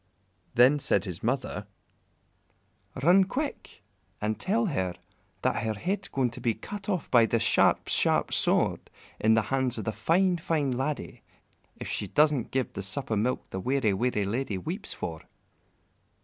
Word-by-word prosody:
Then 130 +5 +6
said 130 - +1
his 90 -2 -5
mother, 120 -4 -2 1.4
"Run 180 +5 +6
quick 270 - -5 0.4
and 105 +1 -2
tell 225 +4 +1
her 95 - -1 0.5
that - - +1
her 110 -1 -1
head's 190 - -2
going 130 -3 0
to - - -10
be 115 -2 +1
cut 205 - -7
off 180 -6 -2
by 115 -2 +6
the 115 - +1
sharp, - - +3
sharp - - +2
sword - - +2 0.3
in 110 +1 +4
the 110 - +3
hands 130 -2 +1
of 110 - -3
the 110 - -1
fine, 175 - +2
fine 155 -4 0
laddie, 135 +3 -3 0.5
if - - -7
she - - -3
doesn't 150 -5 +2
give 130 -1 -2
the - - -4
sup 105 +7 -2
o' - - +3
milk 115 +5 -1
the 95 - -3
weary, 125 -1 +1
weary 105 -1 0
lady 110 0 -2
weeps 185 - -5
for." 80 -2 -5
125 Hz, 165 wpm, -28 LUFS, 110-155 Hz, 1.4 s, Then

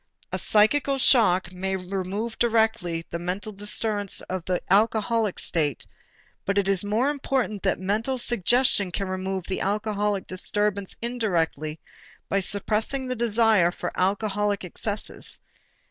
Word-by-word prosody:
A - - -2
psychical 270 +6 +3
shock 190 -9 +3
may 190 +1 -2
remove 195 +4 -4
directly 220 -8 +1
the 170 - -3
mental 185 +5 -4
disturbance 205 0 -1
of 185 -2 -5
the 180 -1 0
alcoholic 220 0 +2
state, 150 -7 -1 0.6
but 200 0 -1
it 200 -1 +2
is 195 -1 +2
more 225 +7 +1
important 260 -7 -2
that 190 - +1
mental 215 +7 -1
suggestion 240 -2 +3
can 195 +2 -3
remove 185 0 -3
the 190 - -3
alcoholic 205 -1 -1
disturbance 200 +1 -2
indirectly 170 - -1 0.5
by 195 - +2
suppressing 215 +7 -1
the 255 - -2
desire 225 -5 +3
for 175 0 -5
alcoholic 205 +1 0
excesses. 205 +3 +1
205 Hz, 130 wpm, -25 LUFS, 185-225 Hz, 0.6 s, psychical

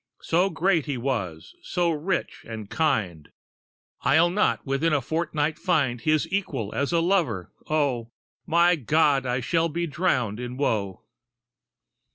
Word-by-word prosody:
So 180 +4 +2
great 170 -2 +1
he 140 -3 -2
was, 110 -11 -3
so 175 -1 0
rich 165 +4 -2
and 110 -3 -7
kind, 110 - 0 0.7
I'll 160 +7 +4
not 210 +3 +1
within 140 +4 +1
a 145 - +3
fortnight 155 +2 -1
find 135 -9 +1
His 155 -1 +2
equal 145 - -2
as 140 +2 -1
a 170 -1 +2
lover. 165 - 0 0.2
O, 140 -7 0 0.4
My 170 +2 +4
God! 145 -1 +2
I 125 +1 0
shall 165 +6 +1
be 170 +3 -2
drowned 140 - 0
in 125 0 -5
woe!" 105 -9 -1
150 Hz, 140 wpm, -25 LUFS, 120-170 Hz, 0.7 s, I'll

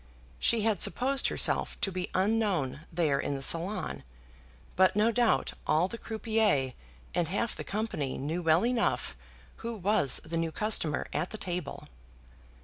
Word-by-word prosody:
She 225 -2 +3
had 220 -2 +1
supposed 270 +2 +3
herself - - +1
to 195 - +2
be 180 -1 -4
unknown 185 - 0
there 160 -5 +1
in 140 - -2
the 135 - -5
salon, 175 +8 0 0.7
but 185 +1 +4
no 215 +2 +3
doubt 235 0 +1
all 165 +4 +3
the 230 +4 -8
croupiers 220 - 0 0.4
and 175 -2 0
half 205 +7 -1
the - - -6
company 200 -10 -3
knew 160 +6 -3
well 165 +4 +3
enough 245 -1 0 0.4
who 230 0 -5
was 190 - +2
the 165 +1 -3
new 165 -1 -1
customer 190 -7 0
at 180 - -1
the 220 - -7
table. 180 -3 -5
185 Hz, 150 wpm, -29 LUFS, 160-220 Hz, 0.7 s, but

